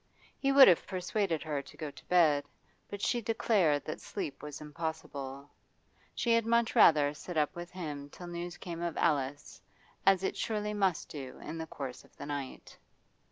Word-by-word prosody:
He 275 - +2
would 275 -1 +10
have 175 - +4
persuaded 185 -2 -1
her 150 -3 -2
to 130 - -15
go 155 -3 -5
to - - -15
bed, 155 -5 +4 0.4
but 205 0 -6
she 240 - +1
declared 200 - +2
that 155 - -5
sleep 140 - -5
was 150 0 -7
impossible; 150 -3 -5 0.7
she 235 - +2
had 230 0 +4
much 235 +1 +2
rather 150 -9 +6
sit 165 +3 -7
up 150 -1 +1
with 175 0 -6
him 150 -6 -6
till 175 - -10
news 175 0 -5
came 170 -2 -6
of 170 -2 -2
Alice, 145 -3 0 0.4
as 195 -1 +4
it - - -1
surely 210 -1 -2
must 195 -5 +1
do 135 -4 -8
in 160 +1 -6
course 135 -4 -6
of - - -24
the - - -7
night. 140 -2 -6
165 Hz, 175 wpm, -32 LUFS, 145-195 Hz, 0.7 s, would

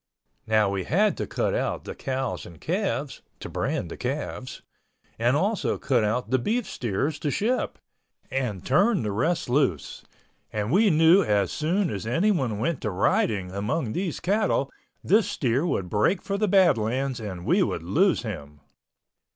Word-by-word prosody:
Now 110 -1 +3
we 100 -1 -2
had 205 +6 +2
to - - -3
cut - - -1
out - - -1
the - - -6
cows 130 -1 -3
and 85 -2 -13
calves 150 - -2 0.2
(to - - -7
brand - - -2
the - - -7
calves) - - -4 0.6
and 120 +4 +3
also 200 +6 0
cut 125 -5 +1
out 120 +5 -1
the 130 - +3
beef 225 - -1
steers 135 +7 -2
to 150 - -1
ship, 230 - -1 0.5
and 125 -9 -2
turn 190 - +3
the 105 - -2
rest 160 - 0
loose, 125 - 0 0.5
and 105 +2 -2
we 205 +4 +5
knew 165 +3 +6
as 105 - +1
soon 170 +3 0
as 100 +1 -5
anyone 135 - +1
went 125 +7 -1
to 110 - -1
riding 95 0 +1
among 110 - -2
those 180 -4 -2
cattle 195 -8 +1 0.3
this 210 +1 +3
steer 135 - 0
would 95 - -1
break 110 - +1
for 200 - -2
the 210 +1 +1
Badlands 135 - +2
and 95 -5 -6
we - - +3
would - - -1
lose 170 - +2
him. 75 -10 -7
135 Hz, 165 wpm, -25 LUFS, -, 0.6 s, knew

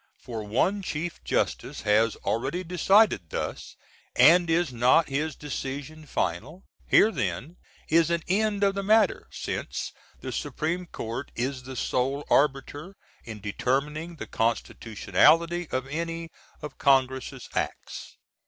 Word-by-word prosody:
For 115 -3 -6
one 130 - +1
Chief 165 -1 -4
Justice - - -1
has 110 +1 +3
already 135 +10 -1
decided 180 - +3
thus; - - -5 0.4
and 170 +1 +6
is 165 -4 +1
not 125 +7 +4
his 145 +2 -2
decision 145 +2 -6
final? 130 - -3 0.2
Here 220 - +5
then 125 - -3 0.3
is 165 +1 +3
an 170 -1 0
end 205 +2 +1
of 195 -1 +3
the 200 - -2
matter; 215 +3 +3
since - - -4 0.3
the - - -6
Sup. - - -5 0.3
Court 115 +5 -5
is 130 +2 -2
the 130 +1 -9
Sole 135 +4 -1
Arbiter 145 +5 +1 0.3
in 110 -3 -8
determining 145 - -2
the - - -7
Constitutionality 160 +9 +1
of 130 0 -2
any 165 +3 -4 0.3
of 150 -2 -8
Congress' 130 -1 +1
acts. - - -4
145 Hz, 125 wpm, -26 LUFS, 125-170 Hz, 0.4 s, and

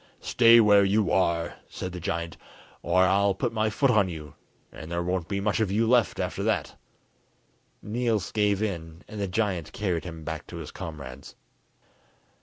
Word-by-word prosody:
"Stay 115 0 +6
where 105 -2 +6
you 100 -1 +2
are," 85 -3 +1
said 90 - -6
the 90 - -6
giant, 85 0 -3 0.5
"or 90 +2 +3
I'll 100 +1 +3
put 120 +3 -2
my 110 -1 +1
foot 135 +5 +2
on 105 -5 +3
you, 75 -3 -8 0.4
and 80 +2 -10
there 85 0 -1
won't 90 -1 -2
be 100 -1 -2
much 105 +2 0
of 110 -3 +1
you 110 +3 +2
left 120 -3 +3
after - - -2
that." - - -1 1.1
Niels 115 -2 -1
gave 105 -1 +1
in, 85 -4 -5
and 105 -1 -7
the 100 - -1
giant 95 -4 -2
carried 90 -5 -1
him 80 -2 -8
back 80 -1 -6
to - - -9
his - - -7
comrades. 70 -4 -8
95 Hz, 175 wpm, -26 LUFS, 85-110 Hz, 1.1 s, Stay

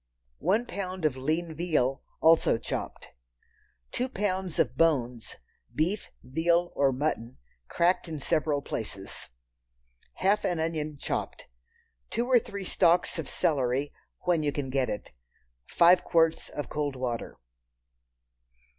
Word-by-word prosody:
One 210 +7 +2
pound 185 -6 -4
of 145 -4 +2
lean 160 +5 -1
veal—also 160 -2 +2
chopped. 115 - -5 0.8
Two 255 +1 -1
pounds 190 -6 -2
of 120 - +1
bones 125 -8 +1 0.4
(beef, 180 +7 0
veal, 170 +6 +1
or 140 -1 +3
mutton) 130 -3 -2 0.3
cracked 175 - +2
in 160 -2 -5
several 150 -1 0
places. 100 -6 -6 0.8
Half 200 +3 +2
an 175 -2 0
onion 155 -2 -2
chopped. - - -3 0.6
Two 235 - -1
or 250 -1 +5
three 200 -4 -7
stalks 175 -1 +2
of 155 - -4
celery, 135 -1 0 0.3
when 175 -3 +2
you 150 -1 0
can 140 -2 -4
get 130 -1 +1
it. 105 - -5 0.6
Five 175 +2 +5
quarts 165 -1 +2
of 145 - -5
cold 145 -2 -2
water. 125 -2 -4
160 Hz, 120 wpm, -28 LUFS, 135-175 Hz, 0.8 s, or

